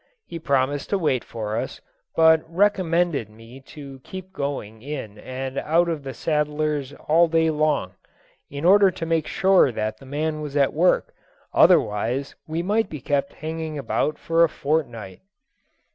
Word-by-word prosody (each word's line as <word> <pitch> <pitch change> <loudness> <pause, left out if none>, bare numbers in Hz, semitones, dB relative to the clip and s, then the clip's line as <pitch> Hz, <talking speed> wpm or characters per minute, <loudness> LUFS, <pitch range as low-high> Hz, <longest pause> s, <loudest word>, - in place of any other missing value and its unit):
He 165 - -7
promised 140 -1 0
to 200 - +1
wait 150 -9 0
for 110 -1 -4
us, - - -4 0.4
but 160 -1 +6
recommended 175 - +1
me 115 +4 -14
to 140 -3 -10
keep 190 0 -9
going 135 - -4
in 130 -7 -7
and 130 +2 -5
out 170 +3 +2
of 160 -3 -2
the 135 -1 -7
saddler's 150 -2 -1 0.2
all 165 +3 +5
day 160 0 +2
long, 150 -12 0 0.6
in 140 +3 -5
order 195 +2 +6
to 180 -2 -5
make 165 -2 0
sure 190 -8 +4
that 110 -1 -3
the 135 - -14
man 155 +2 -2
was 150 -1 -4
at 140 -2 +3
work, 175 +4 +2 0.4
otherwise 120 +7 +3
we 160 +2 -2
might 215 +4 +1
be 150 - -6
kept 140 +1 -1
hanging 160 -1 -4
about 145 +2 -1
for 165 0 +2
a 165 - +4
fortnight. 120 -12 -3
150 Hz, 160 wpm, -23 LUFS, 135-165 Hz, 0.6 s, but